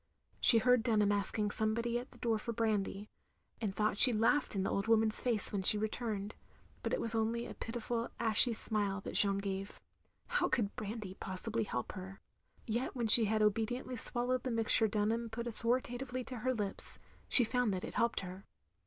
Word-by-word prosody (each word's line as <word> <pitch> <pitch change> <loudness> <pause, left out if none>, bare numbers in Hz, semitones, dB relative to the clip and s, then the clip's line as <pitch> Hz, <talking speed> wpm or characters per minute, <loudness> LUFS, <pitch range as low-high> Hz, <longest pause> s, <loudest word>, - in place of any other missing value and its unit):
She 235 - +6
heard 250 +1 +3
Dunham 215 -3 +1
asking 205 +1 -1
somebody 230 +3 -1
at 245 - -10
the - - -18
door 225 -2 -1
for 235 +2 -5
brandy, 210 -2 -2 0.5
and 200 -4 -3
thought 210 -1 -1
she 255 - +8
laughed 230 +4 +1
in 190 - -1
the - - -2
old 200 +2 -2
woman's 220 -1 +2
face 230 -5 0
when 200 - -1
she 200 +3 +4
returned; 215 -1 -4 0.5
but - - -4
it - - -1
was 230 - -1
only 225 +1 -1
a - - -8
pitiful 230 0 -4
ashy 230 +1 +4
smile 205 -3 -2
that - - -8
Jeanne 200 -1 +4
gave. 195 0 -5 0.5
How - - -1
could 205 -5 -1
brandy 210 -2 -6
possibly 215 +4 -4
help 125 -10 -5
her? 190 +1 -10 0.5
Yet 235 +4 -3
when 240 -2 -2
she 225 +1 +12
had 215 +1 0
obediently 225 +5 -1
swallowed 245 +2 0
the 255 - -4
mixture 225 -1 +3
Dun 210 0 -1
ham 230 0 -3
put 235 +1 -6
authoritatively 245 +2 -3
to 250 +1 -8
her 255 +3 -1
lips, 210 -5 -4 0.3
she 250 - +5
found 245 -1 0
that 185 -1 -4
it - - -7
helped 235 0 0
her. 185 +1 -10
225 Hz, 190 wpm, -33 LUFS, 205-235 Hz, 0.5 s, she